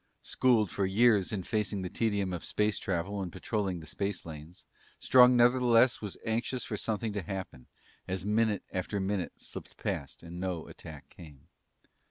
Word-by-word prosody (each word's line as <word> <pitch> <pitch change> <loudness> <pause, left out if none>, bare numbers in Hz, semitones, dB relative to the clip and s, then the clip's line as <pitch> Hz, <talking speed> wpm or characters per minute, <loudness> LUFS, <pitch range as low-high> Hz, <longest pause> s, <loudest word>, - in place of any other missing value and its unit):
Schooled 115 -7 +2
for 100 -1 0
years 105 -1 +4
in 100 -4 -2
facing 105 -1 -1
the - - -2
tedium 100 -5 0
of 85 - -4
space 105 0 0
travel 95 +2 -2
and 90 -2 -4
patrolling 95 -1 -2
the - - -10
space 100 +4 -3
lanes, 80 +2 -10 0.3
Strong 125 0 +6
nevertheless 120 0 +5
was 105 -3 -5
anxious 120 +3 -1
for 105 - -4
something 110 +1 -2
to 105 - -2
happen, 95 -7 -6 0.4
as 95 0 -3
minute 105 -1 +1
after 95 +2 -2
minute 95 -2 -2
slipped - - -9
past 70 +3 -4
and 85 +1 -8
no 90 -3 -3
attack 75 -3 -11
came. 75 -5 -14
100 Hz, 165 wpm, -30 LUFS, 90-110 Hz, 0.4 s, Strong